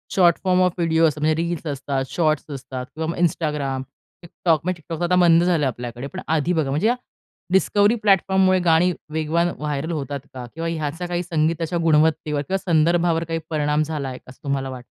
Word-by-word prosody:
Short 175 Hz, -3 st, +5 dB
form 185 Hz, -1 st, +3 dB
of 180 Hz, -1 st, +3 dB
video 165 Hz, -1 st, +3 dB
असं 150 Hz, -1 st, -3 dB
म्हणजे 155 Hz, +1 st, +2 dB
reels 170 Hz, -1 st, -3 dB
असतात, 140 Hz, -1 st, -2 dB
शॉर्ट्स 155 Hz, +1 st, 0 dB
असतात 130 Hz, -1 st, -6 dB
किंवा 160 Hz, 0 st, -3 dB
मग 170 Hz, -, -4 dB
Instagram, 150 Hz, -5 st, -1 dB, 0.4 s
TikTok, 165 Hz, -1 st, +1 dB
म्हणजे 180 Hz, -1 st, -3 dB
TikTok 165 Hz, +2 st, -5 dB
आता 175 Hz, +1 st, +2 dB
बंद 170 Hz, -1 st, +5 dB
झालं 170 Hz, -5 st, +2 dB
आपल्याकडे. 120 Hz, +1 st, -5 dB
पण -, -, -7 dB
आधी 160 Hz, +3 st, +1 dB
बघा, 160 Hz, -5 st, 0 dB
म्हणजे 155 Hz, -, +2 dB, 0.6 s
डिस्कव्हरी 205 Hz, +3 st, +3 dB
प्लॅटफॉर्ममुळे 190 Hz, -2 st, +3 dB
गाणी 175 Hz, 0 st, +3 dB, 0.2 s
वेगवान 160 Hz, +2 st, +1 dB
व्हायरल 150 Hz, +2 st, -3 dB
होतात 140 Hz, -3 st, -3 dB
का? 125 Hz, -1 st, -7 dB
किंवा 165 Hz, +1 st, -4 dB
ह्याचा 160 Hz, +1 st, -3 dB
काही 175 Hz, 0 st, -2 dB
संगीताच्या 165 Hz, 0 st, 0 dB
गुणवत्तेवर 155 Hz, -2 st, +2 dB
किंवा 190 Hz, +7 st, -1 dB
संदर्भावर 170 Hz, -1 st, +2 dB
काही 165 Hz, 0 st, -3 dB
परिणाम 150 Hz, -1 st, +1 dB
झालाय 145 Hz, -4 st, -4 dB
असं 130 Hz, -, -15 dB
तुम्हाला 140 Hz, -2 st, -2 dB
वाटतं? 125 Hz, -2 st, -8 dB
160 Hz, 175 wpm, -22 LUFS, 145-175 Hz, 0.6 s, Short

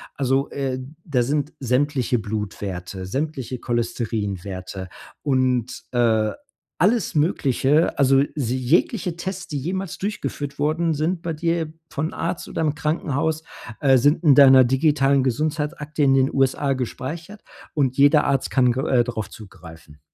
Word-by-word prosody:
Also, 135 Hz, 0 st, 0 dB
äh, 135 Hz, -2 st, -2 dB, 0.3 s
da 135 Hz, -8 st, +1 dB
sind 145 Hz, +3 st, -1 dB
sämtliche 130 Hz, -1 st, +1 dB
Blutwerte, 100 Hz, -3 st, -5 dB
sämtliche 130 Hz, -, -3 dB
Cholesterinwerte 100 Hz, -6 st, -3 dB, 0.3 s
und, 130 Hz, -3 st, 0 dB
äh, 110 Hz, -3 st, +2 dB, 0.5 s
alles 215 Hz, +2 st, +2 dB
Mögliche 150 Hz, 0 st, +2 dB
also 135 Hz, 0 st, +5 dB
sie 130 Hz, -4 st, -1 dB
jegliche 170 Hz, -, +1 dB
Tests, 185 Hz, +1 st, -5 dB
die 145 Hz, -, -3 dB
jemals 185 Hz, +5 st, -4 dB
durchgeführt 150 Hz, -9 st, -4 dB
worden 160 Hz, +3 st, +1 dB
sind, 160 Hz, +4 st, -1 dB
bei 165 Hz, -1 st, -3 dB
dir 165 Hz, 0 st, -1 dB, 0.2 s
von 155 Hz, +4 st, -3 dB
Arzt 170 Hz, -, -3 dB
oder -, -, -3 dB
im 155 Hz, -2 st, +1 dB
Krankenhaus, 155 Hz, +1 st, -1 dB, 0.4 s
äh, 135 Hz, -3 st, +5 dB
sind 145 Hz, +7 st, +2 dB
in 150 Hz, -4 st, +7 dB
deiner 135 Hz, -2 st, +8 dB
digitalen 135 Hz, +1 st, +3 dB
Gesundheitsakte 150 Hz, +3 st, -1 dB
in 135 Hz, -1 st, +5 dB
den 135 Hz, 0 st, +2 dB
USA 135 Hz, +1 st, +1 dB
gespeichert 160 Hz, -, -6 dB, 0.3 s
und 130 Hz, -4 st, 0 dB
jeder 145 Hz, +2 st, +5 dB
Arzt 135 Hz, -2 st, 0 dB
kann 125 Hz, -2 st, +3 dB
gr 130 Hz, +5 st, -2 dB
äh, 125 Hz, -2 st, +3 dB
drauf 115 Hz, -4 st, -4 dB
zugreifen. 85 Hz, -6 st, -13 dB
135 Hz, 135 wpm, -22 LUFS, 120-155 Hz, 0.5 s, deiner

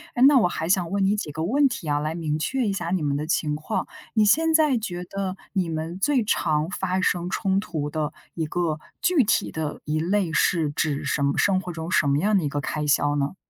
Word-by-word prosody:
诶， 245 Hz, -, -1 dB
那 285 Hz, -2 st, +6 dB
我 220 Hz, -, +4 dB
还 160 Hz, -1 st, -3 dB
想 180 Hz, -2 st, +1 dB
问 200 Hz, -1 st, +1 dB
你 200 Hz, +2 st, +2 dB
几 155 Hz, -8 st, -4 dB
个 160 Hz, +2 st, -4 dB
问 275 Hz, +7 st, +3 dB
题 170 Hz, -10 st, -6 dB
啊， 145 Hz, -, +2 dB
来 155 Hz, +2 st, -2 dB
明 155 Hz, -3 st, -2 dB
确 250 Hz, +8 st, -1 dB
一 200 Hz, -, 0 dB
下 175 Hz, -3 st, -3 dB
你 185 Hz, -3 st, 0 dB
们 145 Hz, -1 st, 0 dB
的 150 Hz, -, -2 dB
情 155 Hz, -2 st, 0 dB
况。 155 Hz, +8 st, -3 dB, 0.3 s
你 215 Hz, -, +4 dB
现 320 Hz, +9 st, +3 dB
在 305 Hz, -6 st, +4 dB
觉 180 Hz, -5 st, -4 dB
得 190 Hz, 0 st, -4 dB, 0.2 s
你 185 Hz, -4 st, 0 dB
们 160 Hz, +2 st, -4 dB
最 255 Hz, +2 st, +2 dB
常 155 Hz, -5 st, +1 dB
发 190 Hz, -1 st, -1 dB
生 180 Hz, -1 st, 0 dB
冲 190 Hz, 0 st, 0 dB
突 155 Hz, -7 st, -4 dB
的 150 Hz, 0 st, -2 dB, 0.2 s
一 160 Hz, -2 st, -2 dB
个 155 Hz, -1 st, -1 dB, 0.2 s
具 345 Hz, -8 st, +3 dB
体 215 Hz, -, +1 dB
的 155 Hz, -2 st, -4 dB
一 155 Hz, +1 st, -1 dB
类 185 Hz, -1 st, 0 dB
是 160 Hz, -2 st, +2 dB
指 145 Hz, -1 st, -1 dB
什 140 Hz, +1 st, 0 dB
么 140 Hz, 0 st, +1 dB
生 190 Hz, -2 st, +2 dB
活 180 Hz, -1 st, -6 dB
中 160 Hz, 0 st, -6 dB
什 155 Hz, -5 st, +2 dB
么 140 Hz, 0 st, +3 dB
样 205 Hz, +5 st, +2 dB
的 175 Hz, -, 0 dB
一 145 Hz, -, -1 dB
个 145 Hz, -, -2 dB
开 150 Hz, +1 st, -3 dB
销 145 Hz, 0 st, +2 dB
呢？ 145 Hz, +5 st, -1 dB
175 Hz, 260 characters per minute, -24 LUFS, 150-200 Hz, 0.3 s, 那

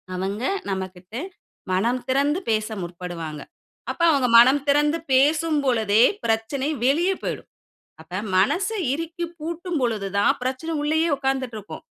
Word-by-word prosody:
அவங்க 195 Hz, +4 st, -3 dB, 0.3 s
நம்மகிட்ட 190 Hz, 0 st, -6 dB, 0.6 s
மனம் 235 Hz, +7 st, +1 dB
திறந்து 280 Hz, +5 st, +1 dB
பேச 215 Hz, -1 st, +1 dB
முற்படுவாங்க. 170 Hz, -3 st, -6 dB, 0.5 s
அப்ப -, -, -7 dB
அவங்க 275 Hz, -4 st, +2 dB
மனம் 260 Hz, +5 st, +7 dB
திறந்து 295 Hz, +2 st, +3 dB
பேசும் 305 Hz, +4 st, +3 dB
பொழுதே 220 Hz, -4 st, +3 dB, 0.2 s
பிரச்சனை 225 Hz, +5 st, 0 dB, 0.2 s
வெளியே 335 Hz, +8 st, +3 dB
போய்டும். -, -, -4 dB, 0.5 s
அப்ப 175 Hz, +4 st, -5 dB, 0.2 s
மனச 340 Hz, -, +2 dB, 0.3 s
இறுக்கி 330 Hz, +3 st, -4 dB
பூட்டும் 340 Hz, +1 st, -3 dB
பொழுது 220 Hz, -5 st, -1 dB
தான் 200 Hz, -, +4 dB
பிரச்சனை 260 Hz, +6 st, -3 dB
உள்ளேயே 315 Hz, +3 st, +1 dB
உட்கார்ந்துட்டு 265 Hz, -3 st, -2 dB
இருக்கும். 205 Hz, -1 st, -9 dB
260 Hz, 125 wpm, -23 LUFS, 200-300 Hz, 0.6 s, மனம்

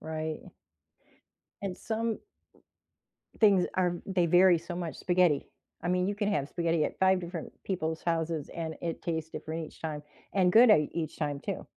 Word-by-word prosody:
Right. 155 Hz, 0 st, -5 dB, 1.1 s
And 190 Hz, -2 st, -4 dB
some 225 Hz, 0 st, -2 dB, 1.2 s
things 200 Hz, -4 st, +5 dB
are 180 Hz, -2 st, +1 dB
they 185 Hz, -3 st, +1 dB
vary 175 Hz, 0 st, +6 dB
so 170 Hz, +1 st, -7 dB
much 170 Hz, -3 st, -4 dB
spaghetti. 175 Hz, -5 st, +2 dB, 0.4 s
I 175 Hz, -, -2 dB
mean, 180 Hz, 0 st, +2 dB
you 205 Hz, -, -1 dB
can 205 Hz, 0 st, -1 dB
have 145 Hz, -8 st, 0 dB
spaghetti 170 Hz, -2 st, 0 dB
at -, -, -4 dB
5 190 Hz, 0 st, +4 dB
different 170 Hz, -1 st, -6 dB
people's 160 Hz, -4 st, -2 dB
houses 165 Hz, -3 st, -1 dB
and 160 Hz, -1 st, -4 dB
it 165 Hz, -1 st, -4 dB
tastes 160 Hz, -1 st, -3 dB
different 160 Hz, 0 st, -5 dB
each -, -, -16 dB
time 150 Hz, -2 st, -4 dB, 0.3 s
and 180 Hz, -2 st, +3 dB
good 230 Hz, 0 st, +8 dB
I 150 Hz, -8 st, +5 dB
each 165 Hz, -2 st, -3 dB
time 145 Hz, -2 st, -2 dB
too. -, -, -5 dB
170 Hz, 170 wpm, -30 LUFS, 160-185 Hz, 1.2 s, good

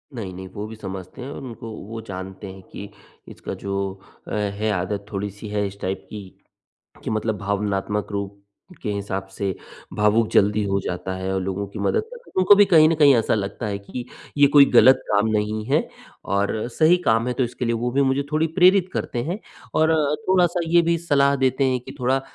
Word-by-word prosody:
नहीं-नहीं 95 Hz, -4 st, -6 dB
वो 105 Hz, +1 st, -5 dB
भी 110 Hz, -, -9 dB
समझते 95 Hz, +2 st, -8 dB
हैं 135 Hz, -, -6 dB
और -, -, -7 dB
उनको 115 Hz, -2 st, -8 dB, 0.2 s
वो 115 Hz, 0 st, -6 dB
जानते 95 Hz, +1 st, -7 dB
हैं 95 Hz, -, -12 dB
कि 100 Hz, 0 st, -8 dB, 0.4 s
इसका -, -, -7 dB
जो 100 Hz, 0 st, -3 dB, 0.5 s
अ, -, -, -8 dB
है 105 Hz, +1 st, -1 dB
आदत 100 Hz, +2 st, -2 dB
थोड़ी-सी 100 Hz, +1 st, -5 dB
है 105 Hz, -1 st, -1 dB
इस 100 Hz, +1 st, -11 dB
टाइप 95 Hz, 0 st, -3 dB
की 105 Hz, -3 st, -8 dB, 0.8 s
कि -, -, -3 dB
मतलब 110 Hz, -1 st, -1 dB
भावनात्मक 100 Hz, 0 st, -2 dB
रूप 100 Hz, 0 st, -4 dB, 0.5 s
के 105 Hz, -, -2 dB
हिसाब 100 Hz, -1 st, -4 dB
से 95 Hz, -2 st, -2 dB, 0.4 s
भावुक 105 Hz, +2 st, +3 dB
जल्दी 105 Hz, +1 st, +3 dB
हो 100 Hz, 0 st, 0 dB
जाता 90 Hz, +1 st, -3 dB
है 95 Hz, 0 st, -3 dB
और 95 Hz, -, 0 dB
लोगों 95 Hz, +2 st, -3 dB
की 100 Hz, -, -9 dB
मदद 445 Hz, -, +1 dB
करता, 470 Hz, +2 st, -12 dB
तो -, -, -1 dB
उनको 185 Hz, +2 st, +7 dB
भी 205 Hz, 0 st, +6 dB
कहीं 160 Hz, -5 st, +6 dB
न 165 Hz, -, +2 dB
कहीं 145 Hz, -3 st, +6 dB
ऐसा 115 Hz, -, +1 dB
लगता 100 Hz, +2 st, -4 dB
है 100 Hz, -, -2 dB
कि 120 Hz, +5 st, -7 dB, 0.3 s
ये 145 Hz, 0 st, +7 dB
कोई 145 Hz, 0 st, +7 dB
गलत 125 Hz, +2 st, +7 dB
काम 105 Hz, +1 st, +2 dB
नहीं 105 Hz, 0 st, -1 dB
है 140 Hz, +6 st, +1 dB, 0.5 s
और 100 Hz, +3 st, 0 dB
सही 160 Hz, +7 st, +4 dB
काम 115 Hz, +1 st, +2 dB
है 125 Hz, -, 0 dB
तो 130 Hz, -, 0 dB
इसके 125 Hz, +1 st, -4 dB
लिए 115 Hz, -, +1 dB
वो 120 Hz, +2 st, -1 dB
भी 140 Hz, +2 st, +2 dB
मुझे 135 Hz, +1 st, +1 dB
थोड़ी 155 Hz, +1 st, +2 dB
प्रेरित 185 Hz, +1 st, +5 dB
करते 120 Hz, -1 st, -2 dB
हैं। 175 Hz, +6 st, -3 dB, 0.4 s
और 160 Hz, 0 st, +4 dB
अ, 150 Hz, -2 st, +2 dB
थोड़ा-सा 180 Hz, -2 st, +3 dB
ये 170 Hz, +1 st, +5 dB
भी 170 Hz, 0 st, +1 dB
सलाह 140 Hz, -4 st, +2 dB
देते 130 Hz, 0 st, +1 dB
हैं 125 Hz, -, 0 dB
कि 135 Hz, +3 st, -11 dB
थोड़ा 130 Hz, +2 st, +1 dB
110 Hz, 210 wpm, -23 LUFS, 100-140 Hz, 0.8 s, उनको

